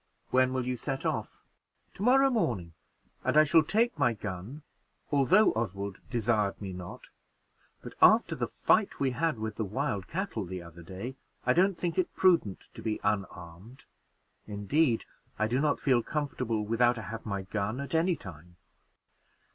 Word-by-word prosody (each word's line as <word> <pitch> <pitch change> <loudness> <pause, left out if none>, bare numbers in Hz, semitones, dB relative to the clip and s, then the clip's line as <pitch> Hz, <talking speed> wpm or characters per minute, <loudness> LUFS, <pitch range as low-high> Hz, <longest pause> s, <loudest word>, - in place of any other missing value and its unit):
"When 130 0 +4
will 130 -1 -1
you 125 0 -2
set 135 +2 -4
off?" - - -3 0.5
"To - - -11
morrow 270 +4 +5
morning; 100 - -1 0.5
and - - +1
I 155 - +9
shall 160 +2 +5
take 210 +4 +1
my 120 -4 +3
gun, 105 - -7 0.5
although 160 +10 +5
Oswald 100 -3 -3
desired 110 -4 0
me 95 -2 -6
not; 90 -1 -9 0.7
but - - -8
after - - +6
the - - -2
fight - - +1
we 135 -2 +1
had 155 +1 0
with 110 0 -5
the 110 - -1
wild 105 -2 -2
cattle 180 - -3
the 95 0 -6
other 85 0 -12
day, 95 +10 -7 0.3
I 125 - +4
don't 190 +2 +3
think 175 +1 -1
it 185 - -1
prudent 170 - +2
to - - -10
be 110 -2 -2
unarmed; 100 +2 -4 0.6
indeed, 115 +5 +1 0.3
I 110 - +1
do 125 +4 0
not 150 -1 +1
feel 130 -4 +3
comfortable 125 -7 -2
without 120 +2 +2
I 110 - -5
have 115 +4 -6
my 100 -3 -3
gun, 105 +5 -3
at 140 +2 -5
any 170 +2 +2
time." 85 - -12
120 Hz, 165 wpm, -29 LUFS, 100-150 Hz, 0.7 s, I